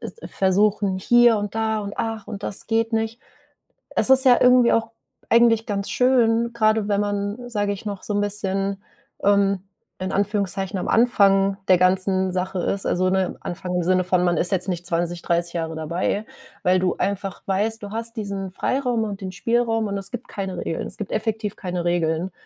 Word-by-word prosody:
äh, - - -5
äh, - - -8
versuchen: 195 0 +1
„Hier 240 +2 +5
und 205 0 -4
da 220 -1 0
und, 200 -1 -6
ach, 225 -2 -3
und 205 -2 -7
das 200 - -3
geht 225 +1 0
nicht.” 225 +2 -2 0.8
Es - - +2
ist 265 0 +6
ja 250 -2 +7
irgendwie 250 -1 +5
auch 225 0 0 0.4
eigentlich 230 -1 +4
ganz 200 -1 -3
schön, 235 -2 +2
grade 215 -2 +2
wenn 205 -1 +1
man, 205 +4 -3
sage 205 -3 -1
ich, 200 - -10
noch 200 -2 -5
so 210 - -3
'n 205 - +1
bisschen, 195 -1 -2 0.4
ähm, 200 -1 +3 0.4
in 185 0 -3
Anführungszeichen 195 -2 -1
am - - -4
Anfang 200 -5 +3
der 185 - +6
ganzen 185 +1 +2
Sache 185 0 -2
ist, 195 +2 -1
also, 185 +1 +1
ne, 190 -1 0
Anfang 180 +1 -5
im 180 - 0
Sinne 185 +1 +2
von, 180 0 +1
man 175 -1 +2
ist 175 - +1
jetzt 185 -1 +1
nicht 175 -2 -3
20, 170 0 -2
30 170 0 -1
Jahre 165 -1 -3
dabei, 170 +6 -2 0.4
weil 185 +1 +3
du 180 -1 0
einfach 195 -1 -3
weißt, 210 +3 -1
du 200 - -7
hast 230 +1 -5
diesen 200 -3 -4
Freiraum 245 +3 -1
und 205 -2 -5
den 190 -1 -5
Spielraum 225 +3 0
und 200 - -3
es 195 - -8
gibt 245 - -6
keine 190 -3 -5
Regeln. 165 - -3
Es - - -5
gibt 210 - -6
effektiv 215 -1 -2
keine 180 -2 -4
Regeln 175 +1 0
200 Hz, 195 wpm, -22 LUFS, 185-225 Hz, 0.8 s, ja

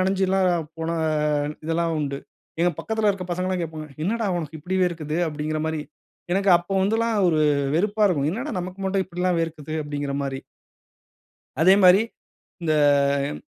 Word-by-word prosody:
நனஞ்சுலாம் 190 0 +2 0.3
போன 165 +1 -2 0.7
இதெல்லாம் 165 +1 0
உண்டு. 140 -1 -3 0.4
எங்க 175 +1 +4
பக்கத்தில 220 -1 0
இருக்கிற 190 -2 -4
பசங்கள்லாம் 185 +1 -1
கேட்பாங்க, 155 -1 -6 0.2
"என்னடா 225 +5 0
உனக்கு 160 -1 -5
இப்படி 180 +5 -2
வேர்க்குது?" 160 -2 -2
அப்படிங்கிற 155 +1 -3
மாரி. 160 -1 -2 0.5
எனக்கு 195 +1 +2
அப்போ 175 +2 -7
வந்துலாம் 225 +3 +1
ஒரு 165 -3 +2 0.4
வெறுப்பா 210 +5 +1
இருக்கும். 150 -6 +1
என்னடா 245 - -4
நமக்கு 185 +2 -7
மட்டும் 190 0 0
இப்படிலாம் 180 0 -1
வேர்க்குது 155 -2 -4
அப்படிங்கிற 145 -1 -4
மாரி. 135 -1 -3 1.2
அதே 185 +4 +7
மாரி, 180 +2 +8 0.6
இந்த 160 - +1 0.6
ம் - - -11
175 Hz, 140 wpm, -24 LUFS, 155-190 Hz, 1.2 s, மாரி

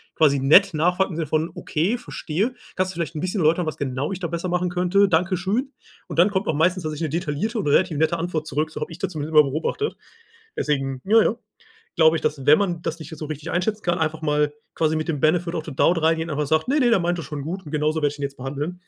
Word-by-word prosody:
quasi 145 -3 +4
nett 175 +8 +6
nachfragt 180 +5 +2
im - - -5
Sinne 165 - -1
von: 155 +3 0
„Okay, 175 +10 -1
verstehe. 215 -1 -3 0.2
Kannst 185 0 0
du - - -16
vielleicht 170 -1 -3
'n 150 - -3
bisschen 185 +3 -2
erläutern, 165 +3 +3
was 155 - -4
genau 135 +3 -2
ich 185 - -4
da 175 - -2
besser 170 +2 -3
machen 180 0 0
könnte. 180 +3 +3
Danke 180 +2 +2
schön.“ 220 +10 -1 0.4
Und - - -4
dann 180 +4 +6
kommt 190 0 -1
auch - - +2
meistens 175 +4 +2
tatsächlich 155 +1 -3
'ne 165 - 0
detaillierte 180 - -3
und 195 - -2
relativ 160 +2 +2
nette 160 +3 +1
Antwort 165 -2 -2
zurück, 155 +2 -1
so - - -7
habe - - -4
ich 165 - -10
das - - -2
zumindest 155 0 -5
immer 150 -2 +7
beobachtet. 160 - -2 0.6
Deswegen 135 -3 -1
ja, 220 +2 +5
ja. - - +1 0.6
Glaube 160 0 +5
ich, - - -7
dass 140 -3 -1
wenn 150 +1 +7
man 175 -4 -1
das 165 - -3
nicht 160 - -9
jetzt 160 - -9
so 155 - -4
richtig 150 -1 -6
einschätzen 210 +4 -1
kann, 175 0 0
einfach 160 0 -1
mal 150 -1 +1 0.2
quasi 160 -1 +1
mit 155 - -3
dem 150 -3 -1
„Benefit 170 +2 +1
of 160 - -2
the 150 - -7
doubt" 165 +4 +3
reingehen, 160 +1 +1
einfach 150 -1 -2
sagt: 155 - +1
„Ne, 290 +3 +3
ne, 250 -3 +4
der 210 - +4
meint 175 +1 0
das 165 - -6
schon 145 0 -5
gut 180 +5 -5
und 145 - -9
genauso 155 +1 0
werde 145 - +3
ich 145 - -13
ihn - - -4
jetzt 140 0 -4
behandeln.“ 145 +7 -5
160 Hz, 265 wpm, -23 LUFS, 150-180 Hz, 0.6 s, immer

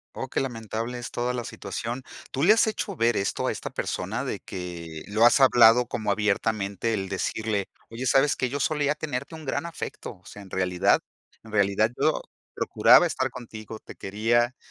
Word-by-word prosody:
Oh, 130 - -4
qué - - -1
lamentable 115 -1 -4
es 120 - -6
toda 125 +1 -2
la 120 -1 -3
situación. 115 +7 -5 0.3
¿Tú 135 - -2
le 210 +5 +7
has 225 - +3
hecho 215 - -3
ver 115 0 +2
esto 100 - -1
a - - +1
esta - - -6
persona? - - -3
De - - -3
que 85 -3 -7
lo 110 +3 +3
has 120 - +6
hablado 120 -2 +6
como 105 -2 -2
abiertamente 105 +1 0
el 95 -2 -2
decirle: 100 +1 -2 0.2
"Oye, 120 +3 -5
¿sabes 135 +3 +4
qué? 130 - -1
Yo 140 +3 -3
solía 150 0 +1
tenerte 145 -1 -5
un 160 -1 -8
gran 145 +4 -2
afecto, 165 - -7
o 90 - -30
sea, 105 - -11
en 95 - -15
realidad 90 -1 +2 0.4
en 110 - -13
realidad, 105 +2 +2
yo - - +2 0.3
procuraba - - +5
estar - - -1
contigo, 110 -3 -9
te - - -12
quería, 120 +5 +1
115 Hz, 190 wpm, -26 LUFS, 100-130 Hz, 0.4 s, le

